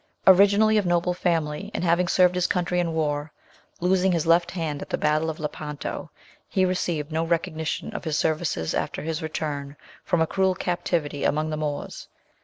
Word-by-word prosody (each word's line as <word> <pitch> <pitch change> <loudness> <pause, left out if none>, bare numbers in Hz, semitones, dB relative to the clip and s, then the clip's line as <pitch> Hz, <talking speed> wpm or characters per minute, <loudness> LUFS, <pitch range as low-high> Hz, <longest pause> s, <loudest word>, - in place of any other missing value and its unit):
Originally 205 +3 +6
of 205 - -2
noble 175 +1 +2
family, 170 +1 -1
and - - -2
having 175 +1 +2
served 180 0 +4
his 180 -1 +1
country 180 0 0
in 170 -1 0
war, 150 -1 -1 0.5
losing 185 +1 +3
his 170 -2 0
left 170 +1 +4
hand 160 -5 -3
at - - -8
the - - -1
battle 155 +1 +1
of 160 - -5
Lepanto, 150 -1 -5 0.4
he 190 -2 +2
received 170 -4 -1
no 160 +1 0
recognition 165 +3 -2
of 210 - -5
his 155 -2 -1
services 155 - 0
after - - -2
his 160 +1 -3
return 145 -3 -4 0.3
from 175 - +1
a 160 - +4
cruel 190 +2 +1
captivity 170 -5 -2
among 155 +1 +1
the 155 - -2
Moors. 150 -2 -4
165 Hz, 180 wpm, -25 LUFS, 155-180 Hz, 0.5 s, Originally